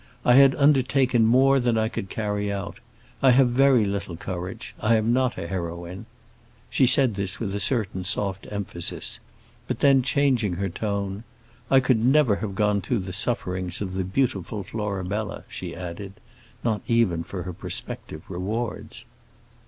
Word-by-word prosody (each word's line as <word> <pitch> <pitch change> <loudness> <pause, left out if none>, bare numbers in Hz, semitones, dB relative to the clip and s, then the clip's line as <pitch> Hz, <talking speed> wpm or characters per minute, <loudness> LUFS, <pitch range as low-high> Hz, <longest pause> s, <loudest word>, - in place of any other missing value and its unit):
"I 120 - +6
had 135 +1 +7
undertaken 130 -4 +3
more 135 +3 +5
than 120 -2 +1
I 110 0 +2
could 95 -3 -5
carry 105 -1 -2
out. 100 0 -5 0.4
I 135 - +6
have 130 0 +5
very 130 -3 +4
little 100 -3 -3
courage; 90 0 -6
I 115 +2 +3
am 110 +2 +2
not 130 0 +1
a - - -4
heroine." 85 +3 -5 0.6
She 130 - +4
said 130 -2 +4
this 100 -1 -3
with 100 -4 -3
a 100 - -2
certain 105 -4 -1
soft 95 +1 -1
emphasis; 100 -4 -2 0.5
but - - -3
then, 135 -2 +5
changing 130 -6 +1
her 95 +2 -2
tone, 100 +1 -3 0.5
"I 135 -1 +6
could 125 -4 +2
never 130 -5 +4
have 100 -2 -5
gone 105 0 +1
through 120 -1 -1
the 95 0 -6
sufferings 90 -4 -1
of 95 -2 -4
the 95 0 -1
beautiful 100 -1 -1
Florabella," 100 0 -4
she - - -7
added, 90 +3 -7 0.5
not 110 -3 0
even 115 -9 +2
for 90 0 -6
her 90 0 -6
prospective 80 -1 -7
rewards. 105 +6 -4
105 Hz, 160 wpm, -25 LUFS, 95-125 Hz, 0.6 s, had